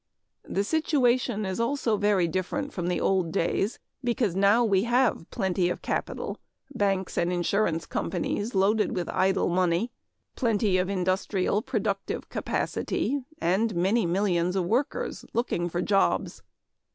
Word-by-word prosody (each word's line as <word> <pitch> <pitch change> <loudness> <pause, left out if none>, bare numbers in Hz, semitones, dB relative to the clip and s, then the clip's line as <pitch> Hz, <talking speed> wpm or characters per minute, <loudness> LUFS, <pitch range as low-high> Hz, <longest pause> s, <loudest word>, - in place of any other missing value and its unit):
The 200 - 0
situation 250 -5 +1
is 190 +1 -3
also 235 -1 +1
very 205 -3 +2
different 195 - -3
from 175 -2 -3
the 180 - 0
old 185 -4 +1
days, 195 +4 0 0.3
because 235 -6 0
now 200 +5 +4
we 200 -1 +2
have 240 -7 +1
plenty 185 -4 0
of 180 - -4
capital, - - -3 0.3
banks 195 -5 0
and 175 +1 +1
insurance 175 -1 0
companies 205 +5 -2
loaded 210 +3 +2
with 180 -2 -2
idle 190 -1 +2
money; 180 +5 +1 0.4
plenty 215 -6 +2
of 180 +1 0
industrial 190 +1 0
productive 205 -6 -2
capacity 285 +1 -1 0.2
and 205 - +1
many 190 +4 +2
millions 180 -1 +1
of 185 -2 +1
workers 245 +9 -1
looking 175 -7 0
for 175 +1 -2
jobs. 195 -2 +1
195 Hz, 135 wpm, -27 LUFS, 180-230 Hz, 0.4 s, now